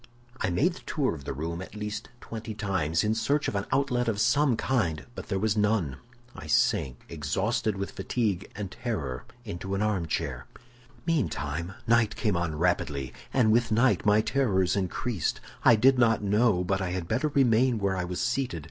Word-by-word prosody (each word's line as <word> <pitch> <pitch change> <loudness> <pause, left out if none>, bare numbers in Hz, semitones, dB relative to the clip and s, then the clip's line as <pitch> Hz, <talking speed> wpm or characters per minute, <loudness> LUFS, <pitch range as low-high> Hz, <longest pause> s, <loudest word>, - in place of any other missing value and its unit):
"I - - 0
made 145 - +2
the - - -11
tour 140 - -1
of 70 -4 -9
the - - -3
room 85 +5 -4
at 95 - -9
least 105 +1 -5
twenty 110 -1 -6
times, 95 -7 0
in 105 0 +2
search 140 +7 +1
of - - -2
an 100 -1 -2
outlet 130 -2 +1
of 110 -3 0
some 130 +2 +3
kind; 85 - 0
but - - -8
there 95 - -1
was 110 +2 +1
none. 105 -10 +1 0.4
I 75 - -9
sank 65 -4 +1
exhausted 100 - -1
with 100 0 -3
fatigue 105 -6 -2
and 100 -3 -5
terror 75 - -4 0.2
into 95 +3 -4
an 100 - 0
armchair. 85 - -2 0.6
"Meantime, 85 - -1
night 115 -2 +3
came 105 -5 0
on 85 -2 -1
rapidly, 75 -6 0 0.2
and 120 -5 +3
with 115 0 +2
night 120 +4 +3
my 105 0 +4
terrors 105 -8 +1
increased. 100 0 -1 0.2
I 120 - +7
did 130 +4 +4
not 115 -3 +3
know 105 -2 +3
but 95 +2 0
I 90 - -1
had 90 -2 -3
better 125 - +1
remain 130 -3 +3
where 100 -2 0
I 90 - -1
was 90 0 -4
seated. 125 -6 -1
105 Hz, 185 wpm, -28 LUFS, 90-120 Hz, 0.6 s, I